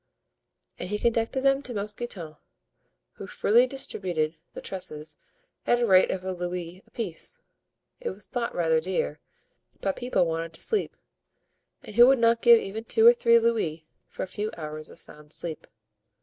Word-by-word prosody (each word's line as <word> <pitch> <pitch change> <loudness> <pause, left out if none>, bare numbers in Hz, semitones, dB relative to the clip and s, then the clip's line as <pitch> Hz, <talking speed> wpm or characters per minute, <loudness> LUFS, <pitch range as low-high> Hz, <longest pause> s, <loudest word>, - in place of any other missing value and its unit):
And 180 - -5
he 210 - -1
conducted 230 +3 0
them 275 0 +3
to 250 -4 -7
Mousqueton, 205 -6 -4 0.8
who - - -10
freely 240 +4 +3
distributed 180 - -2 0.2
the - - -7
trusses 155 -5 -5 0.5
at 240 - +4
the 240 - +1
rate 190 -4 +5
of 185 0 -3
a 190 - -1
louis 180 0 -5
apiece. 195 -9 -5 0.6
It - - -3
was - - -5
thought 240 -1 -3
rather 160 -2 +2
dear, 160 - -2 0.6
but 195 -1 -1
people 245 -7 +1
wanted 165 0 -3
to 160 - -11
sleep, 435 - -1 0.9
and 210 - -11
who 240 +1 +9
would 270 0 +5
not 230 0 +3
give 235 -1 +8
even 220 +3 -6
two 445 - +3
or 475 - +10
three 235 - +4
louis 215 -9 0 0.2
for - - -6
a - - -4
few 210 +3 -3
hours 155 -1 -7
of - - -14
sound 150 0 -3
sleep? 165 -2 -5
195 Hz, 165 wpm, -26 LUFS, 165-235 Hz, 0.9 s, or